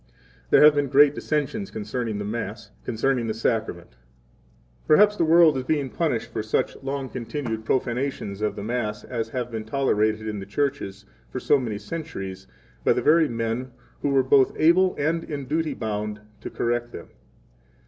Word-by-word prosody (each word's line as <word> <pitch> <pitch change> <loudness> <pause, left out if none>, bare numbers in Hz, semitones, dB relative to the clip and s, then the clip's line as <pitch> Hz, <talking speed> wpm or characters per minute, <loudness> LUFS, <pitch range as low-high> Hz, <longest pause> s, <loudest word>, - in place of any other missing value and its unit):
There - - +6
have 150 0 +9
been 145 -1 +1
great 140 +3 +6
17 - - -16
dissensions 155 +7 -2
concerning 110 +1 -3
the 105 - -4
Mass, 110 0 -5
concerning 120 +1 0
the 110 - -2
Sacrament. 110 -6 -2
18 - - -29 0.9
Perhaps 210 +6 +6
the 165 - +2
world 160 -1 +6
is 130 - -2
being 140 -1 -1
punished 140 -9 -1
for - - -1
such 110 0 -1
long 135 0 -3
continued 120 -3 -4
profanations 125 -5 -2
of 105 - 0
the 100 - -6
Mass 105 -2 -2
as 115 -3 -4
have 125 0 -4
been 110 -1 -4
tolerated 110 -3 0
in 105 -1 -3
the 95 - -8
churches 100 -5 -2 0.2
for 130 - -4
so 145 +2 +3
many 115 -5 -3
centuries 95 - -6 0.4
by - - +4
the - - -1
very 160 +2 +5
men 115 +2 -3 0.3
who - - 0
19 - - +1
were 135 -1 +4
both 130 0 +4
able 180 +4 +4
and 165 +3 0
in 145 -3 -5
duty 155 +3 -1
bound 105 -1 -3 0.2
to - - -7
correct 120 0 -1
them. - - -9
125 Hz, 180 wpm, -24 LUFS, 110-145 Hz, 0.9 s, have